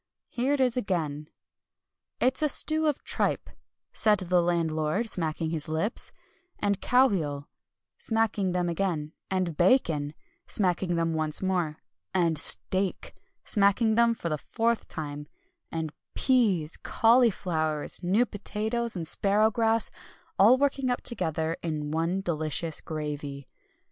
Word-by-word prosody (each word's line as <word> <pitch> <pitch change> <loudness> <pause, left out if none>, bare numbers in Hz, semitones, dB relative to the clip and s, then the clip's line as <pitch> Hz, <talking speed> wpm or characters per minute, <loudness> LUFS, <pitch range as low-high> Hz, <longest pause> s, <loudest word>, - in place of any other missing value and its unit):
Here 255 +4 0
it - - -5
is 255 -3 +2
again: 155 -9 -2 0.9
"'It's 260 +3 +1
a 305 - +2
stew 315 +2 +1
of 295 - -1
tripe,' - - -1 0.4
said 215 -1 +4
the 180 -2 +2
landlord, 165 +3 0
smacking 160 -4 0
his 155 -3 -3
lips, 160 +8 -1 0.5
'and 200 -1 -1
cowheel,' 170 - +2 0.5
smacking 220 -4 0
them 180 -1 0
again, 170 -3 -2 0.2
'and 185 -4 -1
bacon,' 160 - +2 0.3
smacking 180 -3 +1
them 165 -1 0
once 155 +2 -1
more, 175 -5 0 0.4
'and 165 -4 +2
steak,' 185 - +2 0.3
smacking 210 +2 +3
them 235 +1 +3
for 170 - -4
the 155 -1 -2
fourth 230 +5 -1
time, 145 -1 -6 0.4
'and 160 -2 -4 0.2
peas, 200 - +2
cauliflowers, 180 - +2
new 195 +7 +2
potatoes, 220 +2 -3
and 170 -3 -3
sparrowgrass, 220 +4 +2 0.5
all 225 +7 +7
working 275 -1 0
up 245 - -1
together 160 -7 -1
in 150 -3 -3
one 165 +4 0
delicious 160 -2 -1
gravy.' 145 -3 -5
180 Hz, 125 wpm, -27 LUFS, 155-225 Hz, 0.9 s, all